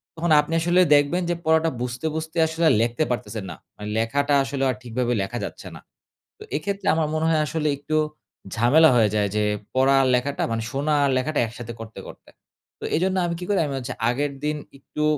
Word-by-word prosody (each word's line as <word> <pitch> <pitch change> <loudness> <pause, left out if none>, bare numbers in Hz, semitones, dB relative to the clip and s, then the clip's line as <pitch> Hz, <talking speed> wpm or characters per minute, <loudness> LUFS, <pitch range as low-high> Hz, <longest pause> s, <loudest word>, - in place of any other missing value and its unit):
তখন 165 0 -1
আপনি 155 +2 -6
আসলে 175 +2 +3
দেখবেন 145 +5 +2
যে 175 - +1
পড়াটা 160 +1 +3
বুঝতে, 125 +5 -4
বুঝতে 160 +1 -5
আসলে 160 +1 +1
লেখতে 120 +6 0
পারতেছেন 115 -3 -4
না। 80 - -7 0.4
লেখাটা 140 +6 +1
আসলে 135 0 -3
আর 130 - 0
ঠিকভাবে 125 0 -2
লেখা 95 - -4
যাচ্ছে - - -11
না। - - -15 0.6
তো - - -9
এক্ষেত্রে 200 +6 -3
আমার 160 -2 +1
মনে 155 0 0
হয় 155 -1 +2
আসলে 155 0 -2
একটু 155 +2 -4 0.6
ঝামেলা 145 +8 +5
হয়ে 110 -3 +4
যায় 105 -1 +2
যে, 105 - +2 0.3
পড়া 135 +1 +4
আর 130 - +2
লেখাটা 140 +3 -1
মানে 115 0 -1
শোনা 145 +3 0
আর 140 - +3
লেখাটা 150 +3 -1
একসাথে 120 +1 -8
করতে, 115 0 -9
করতে। - - -13 0.5
তো - - -11
এজন্য 185 +3 +1
আমি 170 -1 -2
কি - - -6
করি? 200 - +2
আমি 140 - -4
হচ্ছে 125 0 -5 0.2
আগের 140 +3 -1
দিন 150 0 -1 0.2
একটু 150 +2 -5
145 Hz, 200 wpm, -23 LUFS, 125-160 Hz, 0.6 s, ঝামেলা